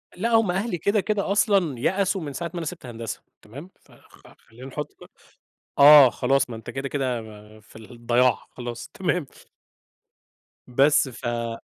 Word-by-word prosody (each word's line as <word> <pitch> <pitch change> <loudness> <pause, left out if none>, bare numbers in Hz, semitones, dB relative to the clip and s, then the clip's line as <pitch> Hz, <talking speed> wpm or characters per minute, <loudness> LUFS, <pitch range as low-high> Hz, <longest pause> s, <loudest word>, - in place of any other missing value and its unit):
لأ 225 +6 -2
هُم 225 -5 +3
أهلي 190 0 -2
كده، 200 +5 +1
كده، 205 -1 -2
أصلًا 195 - +1
يأسوا 190 - 0
من 145 -2 -6
ساعة 170 +5 -4
ما - - -6
أنا 165 - -4
سِبت 165 -3 -7
هندسة، 115 -2 -7 0.2
تمام، 140 - -12
ف - - -26
خ - - -20
خلّينا 120 +4 -15
نحُط 150 +2 -7
بقى - - -15 0.7
آه 140 -2 +9
خلاص 135 +1 0
ما 115 - -6
أنت 110 - -9
كده، 135 +1 -5
كده، 130 -5 -2 0.4
في 105 - -19
الضياع، 120 +2 0
خلاص 120 -2 -8
تمام 180 -5 -1 1.4
بس، 135 +3 +3
ف 115 -1 -4
140 Hz, 160 wpm, -24 LUFS, 120-180 Hz, 1.4 s, آه